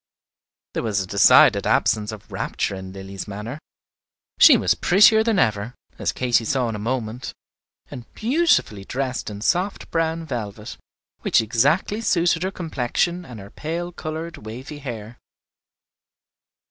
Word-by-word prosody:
There - - -2
was 110 -3 -1
a 95 - -2
decided 100 +2 +5
absence 105 0 +1
of 110 -2 -11
rapture - - -2
in 95 -1 -7
Lilly's 95 +1 -8
manner. 105 +8 -6 0.8
She - - +9
was - - +2
prettier 220 +4 +5
than 225 -2 +1
ever, 110 - 0 0.2
as - - 0
Katy 120 -2 +1
saw 125 +2 0
in 110 - -4
a - - -5
moment, 120 +1 -4 0.6
and 120 -2 -10
beautifully 245 - +1
dressed 130 +3 -3
in 100 -1 -8
soft 185 - -1
brown 165 0 -1
velvet, 110 -6 -6 0.4
which - - +2
exactly 140 - +1
suited 175 -5 +2
her 190 - 0
complexion 170 +1 -2
and 120 -6 -10
her 100 0 -11
pale 170 +3 -4
colored 160 0 -6
wavy 125 +7 -8
hair. 120 -4 -8
125 Hz, 140 wpm, -22 LUFS, 105-170 Hz, 0.8 s, She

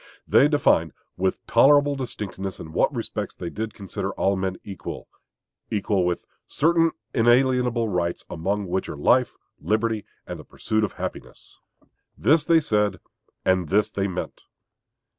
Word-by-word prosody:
They 140 - +6
defined 85 - +2 0.2
with 95 +1 -1
tolerable 145 +4 +5
distinctness 100 -7 -5
in 80 - -9
what - - +2
respects - - -4
they 85 - -6
did 110 -1 -5
consider 100 -3 -4
all 100 +1 +1
men 95 0 -1
created 100 - -11
equal - - -7 0.6
equal 100 -3 0
with 90 - -2 0.2
"certain 165 +2 +2 0.2
inalienable 125 0 +3
rights, 90 -3 -2
among 100 +5 -2
which, 95 +1 -2
are - - -6
life, 125 - +3 0.2
liberty, 110 0 0 0.2
and - - -7
the - - -9
pursuit 110 0 -2
of 105 - -1
happiness." - - -8 0.6
This 155 +1 +4
they 165 -1 +4
said, 105 -7 +1 0.5
and 95 -4 +2
this 105 +2 +2
they 100 -1 -1
meant. 90 -2 -5
105 Hz, 145 wpm, -24 LUFS, 95-125 Hz, 0.6 s, They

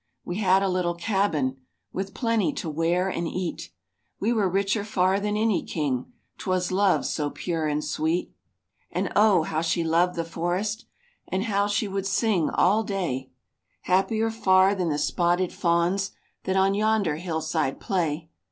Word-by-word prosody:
We 175 - -3
had 195 -2 +3
a - - +2
little 180 -2 0
cabin, 170 -8 0 0.4
With 195 +1 -4
plenty 230 +3 +1
to 230 - -5
wear 170 +4 +1
and 175 -3 -2
eat; 175 - -4 0.5
We 225 +4 +1
were 210 -5 +2
richer 200 +3 0
far 190 -2 +1
than 210 +1 -1
any 220 -2 +2
king, 140 - -2 0.3
'Twas 185 -2 -1
love 195 0 +2
so 150 -2 -1
pure 165 0 -2
and 150 0 -1
sweet. 160 +3 -1 0.6
And 185 +2 -2
Oh! 205 -5 +5
how 155 0 -2
she 170 +1 0
loved 170 +2 +2
the 165 -1 -2
forest, 180 +7 -2 0.4
And 190 +1 -1
how 205 -3 +1
she 205 +1 0
would 195 0 -2
sing 195 -4 +1
all 205 +5 +3
day; 175 - -3 0.5
Happier 215 +5 +1
far 190 -3 +4
than 180 -4 -1
the 145 - 0
spotted 175 +4 +1
fawns 175 +3 +1 0.3
That 190 - 0
on 190 +1 +3
yonder 205 -6 +1
hillside 160 -4 -2
play. 160 -3 -2
185 Hz, 160 wpm, -25 LUFS, 165-200 Hz, 0.6 s, Oh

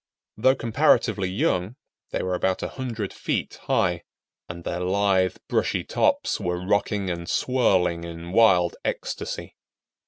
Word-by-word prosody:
Though 130 +5 +4
comparatively 110 -5 +2
young, 95 +2 0 0.3
they - - -2
were 95 - -1
about 95 +1 0
100 115 -6 -4
feet - - -3
high, 90 -1 +1 0.5
and 85 0 -7
their 85 - -3
lithe, 95 0 +2
brushy - - 0
tops - - +1
were 90 0 -2
rocking 100 -1 0
and 85 0 -5
swirling 95 -10 +2
in 85 0 -7
wild 90 -5 +4
ecstasy. - - -4
95 Hz, 125 wpm, -25 LUFS, 90-105 Hz, 0.5 s, Though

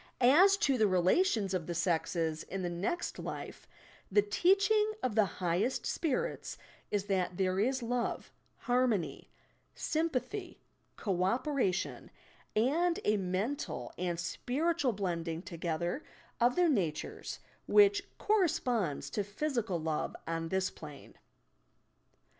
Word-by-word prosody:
As 350 +11 +6
to 275 - +2
the 215 - +5
relations 195 - +2
of 180 -4 -2
the 175 - -3
sexes 165 -1 0
in 190 0 -5
the 175 - -2
next 190 - -2
life, - - -6 0.4
the 205 +1 +5
teaching 395 - +3
of 255 - 0
the 215 -1 +4 0.2
highest 180 +9 0
spirits 415 - -2 0.3
is 205 -1 -1
that 185 -3 -1
there 185 0 +1
is 260 +4 +1
love, 240 0 -2 0.3
harmony, 245 -7 0 0.5
sympathy, 330 +5 -2 0.4
co 185 -4 0
operation 240 -2 0 0.5
and 320 +10 +2
a 210 0 +3
mental 195 +9 -3
and 175 -1 -2
spiritual 275 - 0
blending 170 -4 -3
together 170 - -3 0.4
of 240 +1 +3
their 360 -1 +4
natures 180 - -1 0.3
which 405 -1 +6 0.2
cor 430 -1 +2
responds 240 - 0
to 205 - -1
physical 210 - -2
love 155 -1 -2
on 165 0 -2
this 190 +1 0
plane. 150 -3 -11
210 Hz, 120 wpm, -32 LUFS, 180-295 Hz, 0.5 s, As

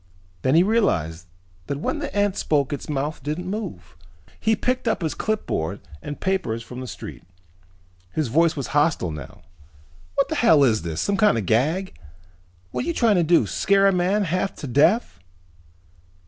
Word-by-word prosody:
Then 130 - +2
he 170 - +6
realized 90 - 0 0.4
that 140 - -2
when 300 - -2
the 290 - -4
ant 205 -1 +2
spoke 145 -2 0
its 145 - -6
mouth 145 +1 -2
didn't 155 +6 -3
move. 190 - -6 0.4
He 220 0 +2
picked 250 +1 -1
up 220 -5 0
his 160 - -1
clipboard 100 - -2 0.2
and 145 0 -6
papers 180 -13 -1
from 125 +2 -8
the 130 - -6
street. - - -8 0.9
His 155 +4 -1
voice 160 +7 +3
was 140 -4 -3
hostile 145 - +2
now. 75 -4 -9 0.7
"What - - +2
the - - -3
hell 150 -3 +5
is 115 -5 +3
this, 80 -1 -3
some 200 - 0
kind 210 - +4
of 110 - -1
a - - -8
gag! 155 - +1 0.8
What - - -2
are - - -6
you 340 - -1
trying 225 -5 +3
to 175 - +3
do, 165 -7 +4
scare 195 - +2
a - - +5
man 185 +4 +2
half 185 +2 -1
to - - -7
death!" 150 - +2
160 Hz, 180 wpm, -23 LUFS, 125-195 Hz, 0.9 s, he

